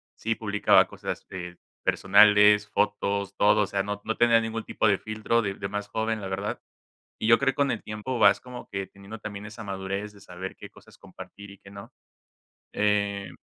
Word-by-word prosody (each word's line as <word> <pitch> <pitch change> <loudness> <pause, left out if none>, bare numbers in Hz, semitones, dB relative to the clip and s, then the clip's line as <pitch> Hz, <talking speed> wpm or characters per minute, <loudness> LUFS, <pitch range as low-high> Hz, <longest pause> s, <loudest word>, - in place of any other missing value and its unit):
Sí 115 +1 -2
publicaba 105 -2 +3
cosas, - - -6
este, 90 -1 -8 0.3
personales, 105 +1 +5
fotos, 100 -1 -1
todo. 105 +1 +4
O - - +2
sea, 100 +1 -1
no 105 +1 -4
no 110 - -3
tenía 120 -1 +5
ningún 115 0 -4
tipo - - 0
de 100 -2 +2
filtro, 110 +2 -1
de 100 -3 -3
de 100 - -5
más 105 +1 -4
joven, 110 +1 -2
la 95 - -5
verdad. 95 +2 -4 0.6
Y - - -1
yo 115 0 +7
creo 135 -1 +2
que - - -18
con 140 -1 +1
el 115 - -4
tiempo, 105 +4 -4
vas - - +6
como 125 -1 -10
que, 95 -1 -4
teniendo 100 +3 -11
también 105 -1 -7
esa 110 +1 -9
madurez 100 +1 -4
de 100 - -17
saber 95 0 -8
qué - - -11
cosas - - -19
compartir 100 0 -12
y 100 - -14
qué 100 - -16
no. 100 0 -11 0.8
Eh, 100 -1 0
105 Hz, 200 wpm, -26 LUFS, 100-110 Hz, 0.8 s, yo